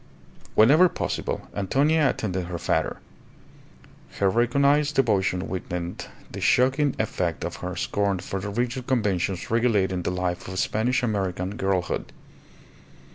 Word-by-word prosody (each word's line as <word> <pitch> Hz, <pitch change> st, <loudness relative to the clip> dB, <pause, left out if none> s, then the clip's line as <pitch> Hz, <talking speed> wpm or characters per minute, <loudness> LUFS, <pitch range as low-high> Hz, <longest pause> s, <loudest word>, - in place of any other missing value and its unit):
Whenever 150 Hz, +12 st, +6 dB
possible -, -, -3 dB
Antonia 140 Hz, -, +2 dB
attended 95 Hz, -7 st, -2 dB
her 90 Hz, -1 st, -4 dB
father; -, -, 0 dB, 1.2 s
her 100 Hz, -1 st, +3 dB
recognized 140 Hz, +6 st, +2 dB
devotion 95 Hz, -7 st, +1 dB
weakened 90 Hz, -1 st, -5 dB, 0.2 s
the -, -, -6 dB
shocking 135 Hz, +3 st, +3 dB
effect 90 Hz, -6 st, -2 dB
of -, -, -4 dB
her 90 Hz, -1 st, -5 dB
scorn 100 Hz, +2 st, 0 dB
for 95 Hz, +2 st, -4 dB
the 100 Hz, +2 st, -4 dB
rigid 120 Hz, +4 st, -2 dB
conventions 100 Hz, -7 st, 0 dB
regulating 105 Hz, -6 st, +2 dB
the -, -, -2 dB
life 90 Hz, -1 st, -2 dB
of 95 Hz, 0 st, -6 dB
Spanish 120 Hz, +6 st, +1 dB
American 95 Hz, -3 st, -1 dB
girlhood. 95 Hz, -3 st, -1 dB
100 Hz, 125 wpm, -25 LUFS, 90-125 Hz, 1.2 s, Whenever